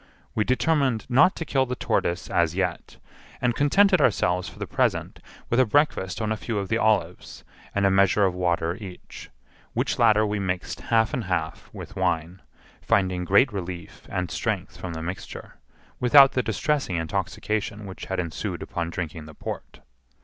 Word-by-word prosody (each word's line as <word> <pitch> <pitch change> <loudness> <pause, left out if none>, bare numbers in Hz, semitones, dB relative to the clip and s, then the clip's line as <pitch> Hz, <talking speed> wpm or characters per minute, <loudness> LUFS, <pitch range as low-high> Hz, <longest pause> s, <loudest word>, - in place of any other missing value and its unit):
We 105 - +1
determined 130 -1 +1
not 135 +9 +5
to 165 - -5
kill 135 -3 +1
the 125 - -3
tortoise 85 -6 -1
as 85 -1 +1
yet, 95 - -2 0.4
and 125 -1 +1
contented 185 - +4
ourselves 90 -7 +2
for - - -16
the - - -4
present - - -1 0.3
with 120 - +1
a 130 - +6
breakfast 105 - +1
on 110 - -1
a 110 - 0
few 115 0 -4
of 100 -1 -3
the 115 - +1
olives, 105 -6 0 0.3
and 100 0 +2
a 100 - +4
measure 100 +1 +4
of 95 - +1
water 85 -1 0
each, 95 -5 -10 0.4
which - - -1
latter 110 -2 +5
we 105 0 -1
mixed 95 -2 -3
half 115 +2 +3
and 125 -6 -2
half, 85 -4 -3
with - - -9
wine, 85 +3 -1 0.4
finding 90 -2 +1
great 100 +7 +4
relief 90 -3 -7
and 90 -2 -3
strength - - -2
from 90 -2 -6
the 80 0 -5
mixture, 90 +3 -7 0.4
without 135 +2 +7
the 130 - +1
distressing 125 - -1
intoxication 105 +5 -2
which 95 -1 -8
had 95 -1 -3
ensued 85 -3 -4
upon 85 -1 -3
drinking 80 -2 -5
the 75 - -12
port. - - -7
100 Hz, 170 wpm, -25 LUFS, 90-120 Hz, 0.4 s, without